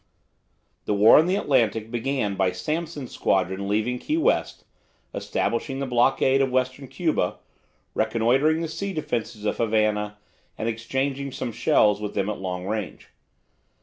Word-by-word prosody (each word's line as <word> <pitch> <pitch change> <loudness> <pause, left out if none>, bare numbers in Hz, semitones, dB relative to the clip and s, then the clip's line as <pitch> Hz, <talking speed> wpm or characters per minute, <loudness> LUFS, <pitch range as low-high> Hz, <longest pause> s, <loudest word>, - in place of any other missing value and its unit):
The 105 - 0
war 105 +6 +7
in 160 - +3
the 185 - +2
Atlantic 115 - +1
began 120 -3 -1
by 95 -1 +1
Sampson's 150 - -4
squadron 95 +1 0
leaving 110 +5 0
Key 310 - -1
West, 330 - 0 0.5
establishing 135 -3 -2
the 140 - -2
blockade 130 +2 +3
of 135 - +2
Western 130 +1 -1
Cuba, 155 - -1 0.6
reconnoitring 120 +8 +2
the 165 - -2
sea 195 +5 -4
defences 120 - -3
of - - 0
Havana, 105 -2 0 0.4
and 110 - -3
exchanging 135 +4 -2
some 125 - -4
shells 105 -1 +3
with 105 - -5
them 100 +1 0
at 105 - -6
long 90 -1 -4
range. 105 0 -4
120 Hz, 145 wpm, -24 LUFS, 105-135 Hz, 0.6 s, war